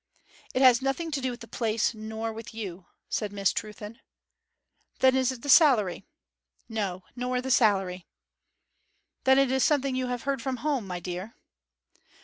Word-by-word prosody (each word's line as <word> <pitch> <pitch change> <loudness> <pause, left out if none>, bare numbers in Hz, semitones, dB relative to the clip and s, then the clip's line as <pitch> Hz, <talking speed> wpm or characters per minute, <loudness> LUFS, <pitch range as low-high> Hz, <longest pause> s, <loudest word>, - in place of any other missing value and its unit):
'It 260 - +3
has 255 -1 +7
nothing 270 +5 -2
to 280 -2 -2
do 260 - -1
with 245 0 -7
the - - -9
place, 225 -1 0
nor 220 +1 -5
with 225 +1 -9
you,' 190 -5 -7 0.2
said 210 -2 -2
Miss 200 -1 +1
Trewthen. 210 +1 -6 1.0
'Then 260 0 +4
it - - +3
is 260 - -7
the - - -8
salary?' 235 - +5 0.6
'No, 200 -5 -3
nor 250 0 -1
the 260 +1 -3
salary.' 195 -7 +2 1.2
'Then 265 0 +6
it 275 -2 +3
is 265 -1 +2
something 275 -3 +2
you 255 0 -1
have 245 -1 -3
heard 275 -2 -1
from 260 0 -2
home, 275 -9 0
my 180 -1 -4
dear.' 180 +5 -6
235 Hz, 165 wpm, -27 LUFS, 210-265 Hz, 1.2 s, has